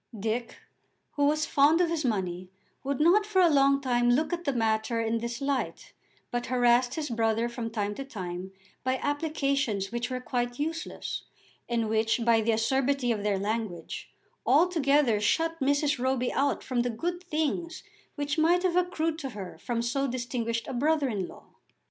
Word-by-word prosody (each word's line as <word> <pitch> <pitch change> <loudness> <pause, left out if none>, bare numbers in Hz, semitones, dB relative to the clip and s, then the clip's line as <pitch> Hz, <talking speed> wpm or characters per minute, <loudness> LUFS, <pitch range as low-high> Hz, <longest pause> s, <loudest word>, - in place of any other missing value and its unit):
Dick, 225 +3 -2 0.5
who 285 - +1
was 305 +1 +2
fond 290 +4 +4
of 355 - +4
his 325 -2 -1
money, 185 -6 -2 0.3
would 275 +1 -2
not 350 +7 +5
for 415 -2 0
a 350 -3 +6
long 275 0 +4
time 245 -3 +1
look 305 +8 +2
at 345 0 -3
the 280 - +2
matter 225 -1 0
in 230 0 0
this 235 +1 -4
light, 275 -1 -2 0.4
but 240 0 -2
harassed 245 0 +3
his 315 -2 -2
brother 225 0 +1
from 235 -1 -4
time 205 -2 -2
to 275 - -5
time 185 -7 -6 0.3
by 260 0 +1
applications 275 -8 -1
which 240 +1 -2
were 255 0 -2
quite 245 -1 -2
useless, 320 +2 -4 0.4
and 230 -2 0
which 220 +2 +1
by 230 -1 +4
the 225 +1 +1
acerbity 255 +3 +1
of 215 -3 -1
their 205 -1 +1
language 205 -4 -4 0.3
altogether 290 - +3
shut 325 +10 +1
Mrs. 285 +1 +1
Roby 255 0 0
out 280 +1 +1
from 255 -2 -2
the 245 - 0
good 345 +10 -3
things 320 +1 -2 0.3
which 290 +1 -1
might 345 +3 +4
have 360 -2 +1
accrued 330 -3 0
to 275 -4 -4
her 190 -3 -7
from 235 -1 -2
so 275 +4 0
distinguished 240 -2 -2
a - - -4
brother 290 +2 +1
in 200 -5 -2
law. - - -14
255 Hz, 175 wpm, -28 LUFS, 230-295 Hz, 0.5 s, a